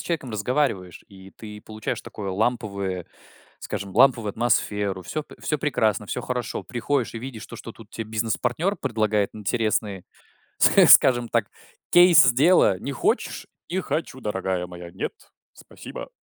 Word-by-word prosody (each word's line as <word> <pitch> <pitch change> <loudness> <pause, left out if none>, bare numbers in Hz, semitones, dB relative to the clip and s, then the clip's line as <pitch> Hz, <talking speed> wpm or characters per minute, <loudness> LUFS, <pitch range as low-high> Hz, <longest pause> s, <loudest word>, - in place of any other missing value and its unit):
человеком 155 -7 -3
разговариваешь, 110 - -1
и 95 -1 -14
ты 105 -1 -10
получаешь 110 0 -5
такое 100 -2 -7
ламповое, 100 -4 -2 0.5
скажем, 100 -1 -6
ламповую 120 -3 +4
атмосферу, 105 -4 0
всё 155 - -4
п - - -16
всё 150 - -1
прекрасно, 110 -8 0
всё - - -4
хорошо. 125 -3 -3
Приходишь 125 +1 -2
и - - -4
видишь 120 -2 -8
то, - - -10
что 115 - -9
тут 110 -1 -16
те 115 - -5
бизнес-партнер 120 - -1
предлагает 110 - 0
интересный, 105 -2 -1 0.6
ск - - +6
скажем 120 -2 +7
так, 115 -3 0 0.4
кейс 175 -8 +7
дела. 145 - +4
Не 140 - -5
хочешь? 135 - -1 0.2
Не 185 +3 -1
хочу, 140 -7 -4
дорогая 95 -3 -2
моя. 90 -1 -10
Нет, 95 - -4 0.4
спасибо. - - -10
110 Hz, 145 wpm, -24 LUFS, 100-125 Hz, 0.6 s, скажем